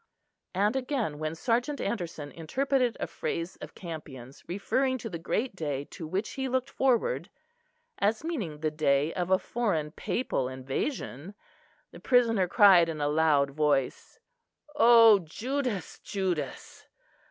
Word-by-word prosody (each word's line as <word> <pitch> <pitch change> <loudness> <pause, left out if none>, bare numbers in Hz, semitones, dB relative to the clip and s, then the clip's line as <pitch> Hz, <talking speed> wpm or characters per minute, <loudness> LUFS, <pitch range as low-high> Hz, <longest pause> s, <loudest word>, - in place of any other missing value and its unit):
And 205 +5 +2
again, 250 - -2
when 155 +1 -3
Sergeant 245 - 0
Anderson 165 -8 -4
interpreted 250 - 0
a - - -1
phrase 165 +3 -4
of - - -10
Campion's 140 -7 -9
referring 260 +8 0
to 225 -3 -7
the 170 - -5
great 215 +7 -2
day 145 -5 -3
to 165 -5 -7
which 190 +6 -2
he 265 -1 -3
looked 260 +1 -1
forward, 265 - +1 0.7
as 215 +5 +1
meaning 210 - -4
the 155 -1 0
day 150 0 +1
of 180 0 -2
a 190 - +5
foreign 185 -10 -2
papal 150 - -2
invasion, 135 - -4 0.6
the - - -12
prisoner 230 -7 +3
cried 180 -3 +6
in 155 -2 -4
a 145 - 0
loud 150 -2 +3
voice: 145 -2 0 0.6
"O 230 -5 +7
Judas, 230 - -4
Judas! 180 -8 -4
185 Hz, 135 wpm, -28 LUFS, 155-240 Hz, 0.7 s, O